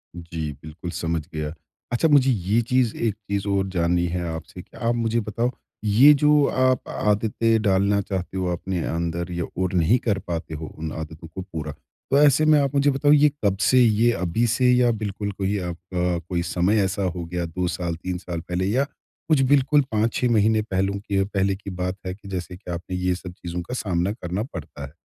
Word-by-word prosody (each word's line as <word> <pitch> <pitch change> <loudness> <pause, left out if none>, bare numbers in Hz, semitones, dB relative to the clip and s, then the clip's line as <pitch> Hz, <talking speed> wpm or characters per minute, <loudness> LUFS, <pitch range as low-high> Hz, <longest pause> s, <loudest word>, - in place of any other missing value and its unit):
जी। 85 -3 -5
बिल्कुल 80 +3 -7
समझ 85 -2 -2
गया। 75 0 -3 0.4
अच्छा 120 +7 +2
मुझे 135 -3 +5
ये 105 +2 +1
चीज़, 125 -1 +1
एक 115 -3 0
चीज़ 100 -1 -4
और 100 -1 +1
जाननी 85 -1 +1
हैं 90 0 -2
आपसे 80 +3 -8
कि - - -17
आप 120 0 0
मुझे 115 0 0
बताओ 115 +4 -1 0.3
ये 125 +9 +7
जो 150 0 +4
आप 130 -1 +2
आदतें 110 +1 +1
डालना 100 0 +2
चाहते 95 -1 -4
हो 95 - -1
अपने 90 0 -3
अंदर 85 +1 -2
या 85 -1 -2 0.2
और 95 0 0
नहीं 90 +7 +4
कर 105 -4 0
पाते 80 -2 -4
हो 80 0 -6
उन 80 0 -4
आदतों 80 +1 -7
को 90 +4 -7
पूरा। 80 -5 -6 0.4
तो 140 - +5
ऐसे 150 +1 +5
में 155 -1 +6
आप 140 0 0
मुझे 140 +1 +4
बताओ 140 +2 +2
ये 150 0 +6
कब 100 -1 +2
से, 130 +5 +4
ये 115 +1 +4
अभी 90 +5 0
से 125 +2 +3
या 125 -1 +4
बिल्कुल 105 -2 -3
कोई 100 +1 -1
आपका 90 0 -2
कोई 85 -2 0
समय 95 +5 +2
ऐसा 100 +1 -1
हो 90 -2 -2
गया 85 0 -3
2 90 +2 -2
साल, 85 -1 -2
3 90 +2 -4
साल 85 -2 -5
पहले 90 +2 -2
या 125 +8 +2 0.5
कुछ 150 -3 +4
बिल्कुल 145 +1 +5
5-6 115 +3 +1
महीने 110 0 +3
पहले 95 -1 -1
के 100 -1 0
पहले 95 -1 0
की 100 0 -9
बात 90 0 -3
है 90 - -3
कि 100 -1 -15
जैसे 90 -2 -5
कि 90 -2 -9
आपने 90 +2 -5
ये 90 0 0
सब 90 -1 -9
चीज़ों 90 -1 -5
का 90 - -7
सामना 95 -5 0
करना 95 -1 -3
पड़ता 80 - -8
है। 70 - -12
95 Hz, 205 wpm, -23 LUFS, 90-115 Hz, 0.5 s, ये